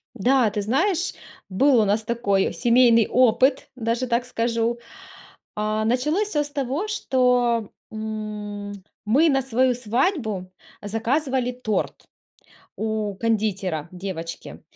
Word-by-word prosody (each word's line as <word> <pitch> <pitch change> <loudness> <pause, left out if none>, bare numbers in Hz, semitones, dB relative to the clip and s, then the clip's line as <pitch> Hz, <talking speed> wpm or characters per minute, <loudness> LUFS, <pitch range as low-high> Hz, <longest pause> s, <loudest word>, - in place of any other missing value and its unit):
Да, 250 +1 +3
ты 210 0 -3
знаешь, 340 - 0 0.4
был 260 +6 +4
у - - +2
нас 210 +2 +1
такой 210 -4 0
семейный 235 -2 +4
опыт, 255 +2 +3
даже 235 +1 -1
так 240 +1 0
скажу. 230 0 -1 0.8
А 215 +1 -1
началось 300 - +1
всё 295 -6 +1
с 290 - -5
того, 285 - -2
что, 250 - +1 0.2
м, 215 -2 -5 0.3
мы 280 +10 +4
на 270 -2 +2
свою 255 0 +2
свадьбу 235 - -1 0.3
заказывали 250 +4 0
торт 245 -4 -2 0.8
у 215 -2 -2
кондитера-девочки. 185 -5 -3
230 Hz, 110 wpm, -23 LUFS, 210-260 Hz, 0.8 s, был